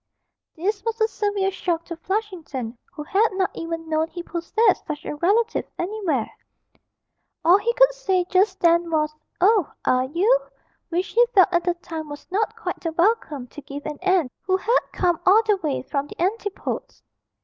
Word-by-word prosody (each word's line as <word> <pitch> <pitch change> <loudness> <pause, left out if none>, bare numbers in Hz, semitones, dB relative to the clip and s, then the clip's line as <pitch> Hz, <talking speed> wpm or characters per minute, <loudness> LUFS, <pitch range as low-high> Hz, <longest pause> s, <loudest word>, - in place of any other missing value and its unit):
This 395 +4 -2
was 455 0 -2
a 440 - +4
severe 410 -3 -1
shock 345 -3 -2
to 335 - -6
Flushington, 330 - -4 0.2
who 300 - -7
had 400 +8 +3
not 380 -1 0
even 330 0 -5
known 315 0 +1
he 345 +1 -7
possessed 375 +5 +1
such 300 -1 -5
a - - -4
relative 430 +8 +1
anywhere; 350 - -1 1.2
all 355 +4 +7
he 470 +3 +1
could - - +6
say 380 -8 0
just 380 +1 +2
then 340 0 +4
was, 305 -1 0 0.3
'Oh, 395 -2 +4
are 255 0 +3
you?' 385 - +3 0.5
which 355 +3 -1
he 480 - +5
felt 380 -1 +7
at 345 -1 +1
the 355 -1 +1
time 320 -3 -7
was 290 0 -8
not 425 +3 0
quite - - -4
the 330 - -3
welcome 345 - +1
to 295 - -10
give 280 +1 -8
an 300 -1 -5
aunt 370 -8 +2
who 375 0 +1
had 465 +6 +2
come 350 -3 +1
all 415 +5 +6
the 420 -2 +3
way 300 -9 -2
from 280 +1 -2
the - - -12
Antipodes. 410 +2 -3
360 Hz, 180 wpm, -23 LUFS, 320-410 Hz, 1.2 s, all